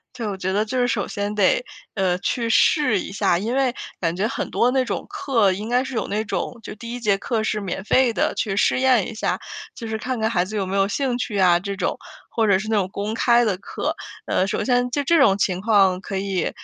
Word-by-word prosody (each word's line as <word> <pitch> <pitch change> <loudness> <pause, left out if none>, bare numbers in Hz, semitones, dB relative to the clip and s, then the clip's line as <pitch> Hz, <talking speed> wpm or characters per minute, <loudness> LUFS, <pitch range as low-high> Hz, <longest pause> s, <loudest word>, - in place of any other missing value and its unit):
对， 230 - -4
我 200 -2 -3
觉 190 0 -2
得 205 +2 +2
就 255 +4 -3
是 245 - +3
首 245 - -1
先 205 0 -3
得， - - +2 0.3
呃， 185 -3 +1
去 230 +4 -1
试 225 - +3
一 - - -7
下。 195 -3 +1
因 220 +6 -2
为 265 -2 +1 0.2
感 165 -2 -1
觉 195 +5 0
很 - - -4
多 245 - +2
那 260 0 +1
种 - - -4
课， 225 -8 +1
应 210 +5 -5
该 250 +1 +3
是 265 0 -6
有 225 - -1
那 210 +1 -1
种， 230 +2 -3
就 - - -8
第 230 +2 -8
一 245 - -5
节 205 -4 +2
课 220 +3 -2
是 215 -1 -1
免 190 0 -4
费 250 +2 +3
的， - - 0
去 200 - -1
试 210 - +2
验 255 -6 +3
一 - - -7
下， 215 - -1 0.3
就 230 - -7
是 220 - -2
看 250 +2 -3
看 220 - +2
孩 185 -6 +1
子 200 +4 -8
有 200 -3 -1
没 190 +1 -2
有 195 0 +3
兴 250 +4 -1
趣 220 -4 -3
啊 180 -2 +5
这 200 +2 -5
种。 - - -1 0.4
或 225 -1 +2
者 200 -3 +4
是 205 - -5
那 220 - +2
种 190 -2 0
公 205 +2 -3
开 235 +1 +3
的 200 -5 0
课， - - -3 0.3
呃， 185 - +1
首 195 - -2
先 245 -1 +1
就 285 +3 -1
这 335 +3 +4
种 200 -8 +5
情 185 -2 0
况， 195 -3 +3
可 195 0 -5
以 190 -2 -1
215 Hz, 275 characters per minute, -22 LUFS, 195-245 Hz, 0.4 s, 啊